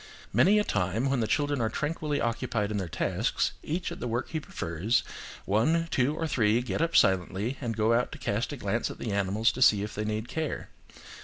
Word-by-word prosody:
Many 205 +3 +5
a 210 - +3
time 105 - 0
when 135 - +1
the 110 - 0
children 145 -1 0
are 110 - +1
tranquilly 150 +2 -2
occupied 115 -2 -1
in 105 - -1
tasks, - - 0
each 170 +3 -3
at - - -7
the - - -3
work 120 +2 -2
he 160 - -2
prefers, 100 - -1 0.4
one, 160 +12 +2
two, 135 +4 +2
or 165 - -2
three, 115 -6 +2
get 125 - -2
up 165 0 0
silently, 95 +7 +2
and 115 -4 -3
go 110 +1 +3
out 120 +1 +1
to - - -7
cast 110 +7 -2
a 145 - -5
glance 110 0 -1
at - - -8
the 115 - -4
animals 100 +3 +2
to 130 - -7
see 105 -5 +6
if 105 - -5
they 105 - -3
need 110 +2 -2
care. 155 +3 -3
115 Hz, 215 wpm, -28 LUFS, 105-145 Hz, 0.4 s, see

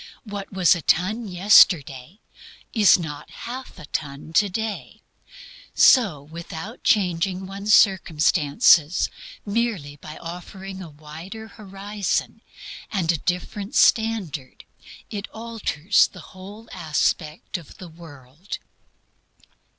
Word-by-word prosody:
What 205 -3 -7
was 190 -3 +4
a 170 - -5
ton 210 +9 +1
yesterday 175 - +4 0.5
is 210 -4 +6
not 160 -5 -7
half 255 +2 -8
a - - -10
ton 145 +2 -5
today. 210 +3 -1 0.7
So 195 - +5
without 165 - -9
changing 185 -2 +1
one's 200 +2 +2
circumstances, 165 - +3 0.3
merely 200 -10 -2
by 155 +2 -10
offering 190 +3 -8
a 175 - -8
wider 160 +9 -10
horizon 200 -1 -4 0.5
and 180 -5 +1
a 165 - -2
different 195 +4 -3
standard, 195 - +1 0.5
it 205 -1 -5
alters 220 -6 +1
the - - -14
whole 200 +4 -11
aspect 160 +1 -2
of 165 - -15
the 185 - -10
world. 160 0 -10
185 Hz, 105 wpm, -23 LUFS, 160-205 Hz, 0.7 s, is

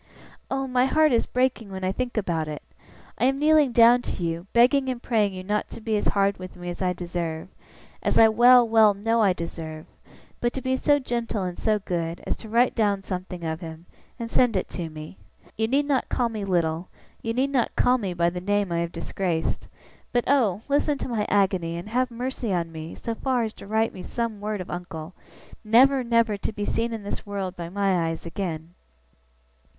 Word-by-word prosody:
Oh, 270 0 -1
my 255 0 +2
heart 310 +2 +4
is 235 - +2
breaking 250 -4 0
when 190 0 -6
I 185 - +1
think 245 +3 -3
about 170 -6 -1
it! 150 -1 -6 0.6
I - - +3
am 270 +1 +2
kneeling 300 -2 +4
down 235 +1 +6
to 180 - -4
you, 170 +2 -3
begging 260 +3 +4
and 250 -2 -3
praying 215 -5 +1
you 185 - -6
not 210 +2 -1
to - - -9
be 220 -1 -1
as 205 - 0
hard 200 -1 +1
with 185 0 -9
me 175 0 -7
as 175 - -8
I 185 -1 +2
deserve 170 -2 -4 0.5
as - - +1
I 225 - +8
well, 240 +2 +6
well, 220 -2 +5
know 225 +3 +1
I 200 -3 +5
deserve 160 -2 -6 0.5
but 240 0 0
to 265 - -4
be 260 0 +1
so 290 +2 +3
gentle 235 -6 -2
and 180 -1 -5
so 215 -1 +2
good, 170 -4 -3
as - - -1
to 220 - -11
write 240 +3 +3
down 205 -3 +1
something 180 -2 -5
of 160 -1 -3
him, 160 0 -8 0.3
and 230 -2 -4
to - - -14
send 245 -4 +3
it 185 - 0
to 170 -3 -5
me. 155 +3 -10 0.4
You 220 0 0
need 280 +4 +2
not 280 -2 0
call 245 -2 +1
me 215 -3 -4
Little, 170 -2 0 0.3
you 230 0 -3
need 270 +2 +1
not 255 -4 0
call 250 +1 +3
me 190 -5 -3
by 170 0 +2
the 180 0 -5
name 205 -1 0
I 170 - 0
have 170 0 -2
disgraced; 175 -4 -2 0.4
but 240 -1 +2
oh, 225 -8 +2
listen 285 +1 +1
to - - -5
my 215 -3 -1
agony, 185 -4 +1
and 175 +5 -7
have 250 +2 +1
mercy 245 -1 -4
on 170 -2 -1
me 160 0 -7
so 230 - -4
far 250 +1 0
as 220 -1 -3
to - - -12
write 220 +2 +1
me 185 - -8
some 230 0 -4
word 210 -1 -3
of 180 - -8
uncle, 175 -1 -6 0.5
never, 255 +5 +5
never 230 -3 +2
to 200 - -3
be 205 -1 -4
seen 230 +2 -1
in 225 -2 -5
this 200 - -5
world 195 -2 -4
by 170 -2 -6
my 190 -3 +1
eyes 165 +1 -4
again! 170 -2 -5
210 Hz, 220 wpm, -25 LUFS, 175-240 Hz, 0.6 s, I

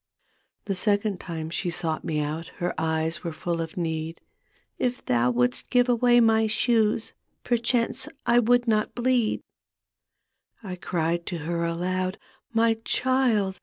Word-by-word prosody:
The 200 - -1
second 205 0 0
time 160 -2 -5
she 175 - -2
sought 170 -2 -2
me 150 -2 -1
out 155 +3 -3
Her 175 0 -1
eyes 160 +1 -1
were 170 - -3
full 170 +1 -3
of 160 +1 -6
need. 160 -1 -3 0.3
" - - -41 0.3
If 250 0 -1
thou 120 0 +2
wouldst 125 +1 0
give 245 -1 +4
away 245 0 +4
my 225 -1 +4
shoes 220 0 +1 0.3
Perchance 240 +2 0 0.2
I 240 0 +5
would 245 +1 +3
not 215 -1 +1
bleed." 245 -2 +1 1.2
I 185 -3 -5
cried 170 -1 -2
to 175 - -3
her 170 0 -1
aloud, 185 +2 -1 0.2
" - - -41
My 225 0 +3
child. 235 -9 +1
190 Hz, 150 wpm, -26 LUFS, 165-230 Hz, 1.2 s, I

